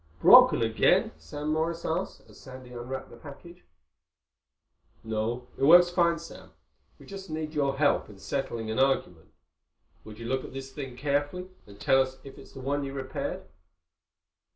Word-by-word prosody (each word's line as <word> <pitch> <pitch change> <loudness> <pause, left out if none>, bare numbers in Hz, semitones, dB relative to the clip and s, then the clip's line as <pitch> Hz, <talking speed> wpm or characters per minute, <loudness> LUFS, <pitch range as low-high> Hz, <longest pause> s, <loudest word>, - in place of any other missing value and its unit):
"Broken - - +7
again?" 110 0 +2
Sam 145 - -5
Morris 165 +1 -2
asked, 175 +4 -3
as - - -17
Sandy 130 -2 -12
unwrapped 125 +2 -7
the - - -12
package. 170 +4 -13 1.4
"No. 110 +3 -3
It - - -2
works 175 +3 +7
fine, 170 -1 +2
Sam. 165 +1 -12 0.4
We - - -16
just 195 -2 -9
need 155 0 -4
your 140 -2 0
help 145 -5 +2
in 105 - -13
settling 115 +2 -4
an 110 - -2
argument. 130 -11 0 0.7
Would 105 -1 -11
you 115 - -8
look 130 +2 -1
at - - -10
this 135 0 -7
thing 135 -4 -7
carefully 145 +6 -2 0.2
and 100 0 -15
tell 135 +5 +4
us 130 0 -3
if 135 - -12
it's - - -15
the 135 - -9
one 140 +2 -1
you 135 0 -5
repaired?" 135 -1 -5
135 Hz, 165 wpm, -28 LUFS, 125-155 Hz, 1.4 s, Broken